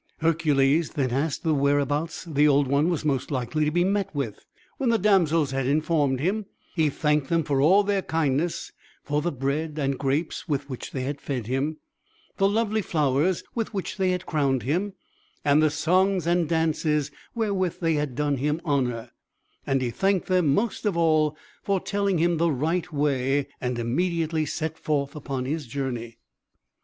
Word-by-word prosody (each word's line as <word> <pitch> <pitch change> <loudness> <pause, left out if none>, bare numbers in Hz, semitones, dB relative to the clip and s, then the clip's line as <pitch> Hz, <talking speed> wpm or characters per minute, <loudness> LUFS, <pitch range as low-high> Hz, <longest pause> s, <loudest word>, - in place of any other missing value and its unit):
Hercules 155 -2 +2
then 130 -4 0
asked 140 +5 -1
whereabouts 145 +2 +1
the 150 -2 +3
Old 140 -1 +4
One 140 +5 +2
was 165 -3 -2
most 135 -4 0
likely 140 +3 -1
to - - +2
be 175 +3 +2
met 200 +1 0
with. 130 -8 -3 0.4
When 260 - +1
the 230 - +4
damsels 165 -8 +3
had 135 -1 -1
informed 145 -2 +1
him, 195 +7 -1 0.3
he 160 -4 +2
thanked 150 -1 0
them 165 -1 +2
for 140 -2 0
all 190 +8 +5
their 200 -1 +1
kindness, 160 0 -1 0.3
for 145 +1 0
the 175 - -1
bread 145 +4 -2
and 140 -3 -1
grapes 145 +6 -1
with 145 -3 -1
which 130 - -6
they 130 - -4
had 140 +2 -4
fed 130 -6 -3
him, 135 +6 -1 0.6
the 195 -1 +3
lovely 220 0 +1
flowers 155 +1 +1
with 225 -2 -3
which 195 - -3
they 190 -1 +2
had 180 0 -1
crowned 135 -6 0
him, 180 - -1 0.5
and 145 +1 +5
the 155 - +4
songs 180 +4 +2
and 170 -2 +1
dances 155 -3 +1 0.2
wherewith 200 -6 -1
they 165 -2 +1
had 150 -4 -1
done 145 0 0
him 150 +4 0
honour 125 -5 -1 0.6
and 135 -1 +1
he 120 - -1
thanked 195 - +1
them, 185 -3 +2
most 215 +10 0
of 205 -6 0
all, 155 -2 +2 0.2
for 200 -3 0
telling 200 -1 0
him 170 +1 +2
the 170 +1 +2
right 165 +6 -1
way 140 -2 +1
and 125 -2 -2
immediately 160 +5 0
set 160 +2 -3
forth 140 -2 -1
upon 135 -3 -4
his 150 0 -3
journey. 120 -3 -4
150 Hz, 175 wpm, -25 LUFS, 140-175 Hz, 0.6 s, all